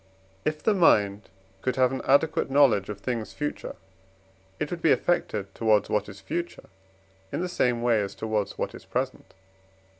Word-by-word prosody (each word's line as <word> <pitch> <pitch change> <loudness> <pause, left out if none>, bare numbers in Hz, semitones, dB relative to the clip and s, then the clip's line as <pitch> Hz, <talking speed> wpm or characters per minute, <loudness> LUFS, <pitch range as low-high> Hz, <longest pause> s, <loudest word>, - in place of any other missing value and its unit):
If 155 0 -1
the 220 - +4
mind 105 - +3 0.3
could 130 +2 -1
have 130 -1 +3
an 130 - -3
adequate 140 +2 +3
knowledge 130 -9 +4
of 105 -1 -5
things 115 -2 -3
future, 150 0 -4 0.8
it - - -2
would 175 -1 -4
be 160 - +4
affected 105 - 0
towards 110 -3 +2
what 105 -1 0
is 100 -1 -10
future 170 +7 -5 0.6
in - - -2
the 180 - -1
same 120 -9 0
way 115 -3 +3
as 100 - -4
towards 110 -2 -2
what - - -3
is - - -11
present - - -3
(IV. 95 0 -31
115 Hz, 175 wpm, -26 LUFS, 100-145 Hz, 0.8 s, the